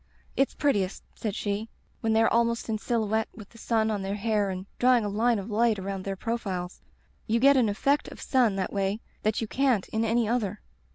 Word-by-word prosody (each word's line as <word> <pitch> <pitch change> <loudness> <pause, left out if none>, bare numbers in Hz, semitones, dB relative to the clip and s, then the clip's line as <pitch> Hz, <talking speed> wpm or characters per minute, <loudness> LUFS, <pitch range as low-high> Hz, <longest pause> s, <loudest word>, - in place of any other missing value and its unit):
*It's 270 - +1
prettiest/ 205 -10 0
said 210 -3 -4
she, 210 +1 -2 0.3
*when 225 -1 0
they 225 +1 +4
are - - +4
ahnost 235 0 +1
in 215 -1 -1
silhouette 220 -1 0
with 205 -2 -11
the 230 - -16
sun 220 -1 +1
on 205 -2 -2
their 195 +1 -2
hair 210 -1 0
and 185 0 -5
drawing 245 -3 +4
a - - -1
line 225 +3 +2
of 200 +2 -6
light 225 0 +3
around 195 0 -4
their 195 -1 -2
profiles. 190 -5 -4 0.5
You 230 +1 +2
get 280 +3 +6
an 245 -5 +3
effect 275 +8 +1
of - - -10
sun 245 -7 +2
that 190 -1 -2
way 200 +1 0 0.2
that 215 +1 0
you 225 - -2
can't 255 -5 +1
in 220 +1 0
any 230 0 +2
other.' 215 -4 -1
220 Hz, 215 wpm, -27 LUFS, 200-235 Hz, 0.5 s, get